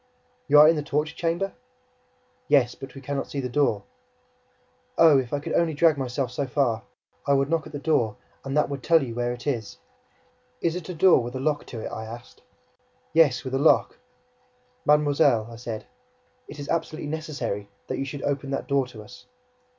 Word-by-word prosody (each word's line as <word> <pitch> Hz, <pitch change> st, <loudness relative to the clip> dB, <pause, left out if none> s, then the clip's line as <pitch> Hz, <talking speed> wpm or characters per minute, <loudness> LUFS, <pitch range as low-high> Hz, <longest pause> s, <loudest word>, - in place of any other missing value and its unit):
"You 150 Hz, -, +6 dB
are 150 Hz, -, +9 dB
in 165 Hz, -, +5 dB
the 150 Hz, -, -1 dB
torture 150 Hz, +2 st, -1 dB
chamber?" 175 Hz, +4 st, -1 dB, 0.9 s
"Yes, 125 Hz, -4 st, +4 dB
but 135 Hz, +1 st, -11 dB
we 135 Hz, -, -9 dB
can 140 Hz, +2 st, -4 dB
not -, -, -4 dB
see 140 Hz, -, -4 dB
the 130 Hz, -, -2 dB
door." 125 Hz, -6 st, +1 dB, 1.1 s
"Oh, 155 Hz, -4 st, +7 dB
if 125 Hz, -2 st, -4 dB
I 145 Hz, -, 0 dB
could 145 Hz, -, -5 dB
only 165 Hz, -2 st, +2 dB
drag 160 Hz, 0 st, +4 dB
myself 130 Hz, -1 st, -2 dB
so 140 Hz, +2 st, -2 dB
far! 120 Hz, -4 st, +1 dB, 0.5 s
I 140 Hz, -, +4 dB
would 135 Hz, +2 st, +1 dB
knock 165 Hz, -2 st, 0 dB
at -, -, -12 dB
the 145 Hz, -, -5 dB
door 140 Hz, -8 st, +1 dB, 0.3 s
and 135 Hz, +2 st, -2 dB
that 150 Hz, -, +3 dB
would 140 Hz, -1 st, -5 dB
tell 165 Hz, 0 st, +4 dB
you 120 Hz, -3 st, -5 dB
where 120 Hz, +1 st, -1 dB
it 120 Hz, -1 st, -7 dB
is." 120 Hz, -7 st, -3 dB, 0.8 s
"Is 165 Hz, 0 st, 0 dB
it 180 Hz, 0 st, -6 dB
a 180 Hz, -, -4 dB
door 175 Hz, -4 st, +5 dB
with 120 Hz, +2 st, -6 dB
a -, -, -3 dB
lock 145 Hz, +1 st, -1 dB
to 115 Hz, -, -7 dB
it?" -, -, -5 dB
I 110 Hz, -, -6 dB
asked. 115 Hz, +2 st, -11 dB, 0.7 s
"Yes, 145 Hz, -7 st, +4 dB
with 130 Hz, -, -6 dB
a 135 Hz, -, +1 dB
lock." 155 Hz, -, +3 dB, 0.9 s
"Mademoiselle," 145 Hz, -6 st, +3 dB
I -, -, -9 dB
said, 115 Hz, -2 st, -6 dB, 0.6 s
"it -, -, -10 dB
is 145 Hz, -1 st, -7 dB
absolutely 160 Hz, -2 st, -2 dB
necessary, 135 Hz, -10 st, -4 dB, 0.2 s
that -, -, -4 dB
you 135 Hz, -, -1 dB
should 140 Hz, +1 st, -6 dB
open 140 Hz, -1 st, -2 dB
that 135 Hz, -, -3 dB
door 140 Hz, -2 st, +1 dB
to 110 Hz, -4 st, -11 dB
us!" 125 Hz, -, -15 dB
140 Hz, 205 wpm, -25 LUFS, 125-150 Hz, 1.1 s, are